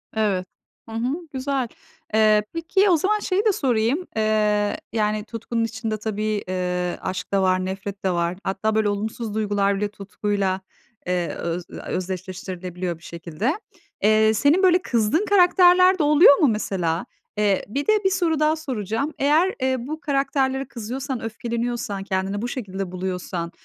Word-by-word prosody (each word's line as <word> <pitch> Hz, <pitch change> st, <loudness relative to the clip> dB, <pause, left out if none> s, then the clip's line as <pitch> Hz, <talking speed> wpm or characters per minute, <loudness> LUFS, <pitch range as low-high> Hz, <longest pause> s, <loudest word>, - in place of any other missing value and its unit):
Evet. 200 Hz, -4 st, 0 dB, 0.4 s
Hı 225 Hz, -, -7 dB
hı, 240 Hz, +4 st, 0 dB, 0.2 s
güzel. 265 Hz, -1 st, -1 dB, 0.5 s
Eee, 215 Hz, -1 st, +5 dB
peki 365 Hz, +5 st, +2 dB
o 350 Hz, -, +5 dB
zaman 415 Hz, +7 st, +1 dB
şeyi 400 Hz, +1 st, 0 dB
de 430 Hz, -, +5 dB
sorayım, 260 Hz, -, +1 dB
eee, 210 Hz, -1 st, +1 dB, 0.2 s
yani 210 Hz, -1 st, 0 dB
tutkunun 230 Hz, 0 st, -3 dB
içinde 225 Hz, -1 st, -3 dB
tabii, 215 Hz, -1 st, -2 dB
ııı, 180 Hz, -1 st, -1 dB
aşk 185 Hz, 0 st, -4 dB
da 195 Hz, -, +3 dB
var 185 Hz, 0 st, +2 dB
nefret 195 Hz, +1 st, -5 dB
de 185 Hz, -, +3 dB
var. 170 Hz, +1 st, -1 dB
Hatta 205 Hz, +3 st, -1 dB
böyle 215 Hz, -1 st, +2 dB
olumsuz 215 Hz, +2 st, -3 dB
duygular 205 Hz, -2 st, +1 dB
bile 210 Hz, +1 st, 0 dB
tutkuyla, 200 Hz, -1 st, -2 dB, 0.5 s
ııı, 180 Hz, -1 st, 0 dB
öz 170 Hz, +1 st, -3 dB
eee, -, -, -7 dB
özdeşleştirilebiliyor 185 Hz, -1 st, -4 dB
bir 165 Hz, -, -22 dB
şekilde. 170 Hz, -, -3 dB, 0.5 s
Eee, 215 Hz, +1 st, +5 dB
senin 290 Hz, -, +3 dB
böyle 360 Hz, -1 st, +5 dB
kızdığın 235 Hz, -, +1 dB
karakterler 365 Hz, -1 st, +5 dB
de -, -, +3 dB
oluyor 295 Hz, -1 st, +7 dB
mu 300 Hz, -, +4 dB
mesela? 185 Hz, -7 st, -1 dB, 0.3 s
Eee, 205 Hz, -2 st, +2 dB
bir 280 Hz, -, -3 dB
de 430 Hz, -, +5 dB
bir -, -, +6 dB
soru 345 Hz, -5 st, +1 dB
daha 305 Hz, +1 st, +3 dB
soracağım. 260 Hz, -, -3 dB
Eğer, 310 Hz, +7 st, +3 dB
eee, 260 Hz, 0 st, +2 dB
bu 305 Hz, +6 st, -5 dB
karakterlere 275 Hz, -2 st, 0 dB
kızıyorsan, 255 Hz, +3 st, -5 dB
öfkeleniyorsan, 235 Hz, -2 st, -3 dB
kendini 195 Hz, +1 st, -2 dB
bu 240 Hz, -, -2 dB
şekilde 195 Hz, -7 st, -5 dB
buluyorsan, 180 Hz, -2 st, -4 dB
215 Hz, 155 wpm, -23 LUFS, 190-275 Hz, 0.5 s, oluyor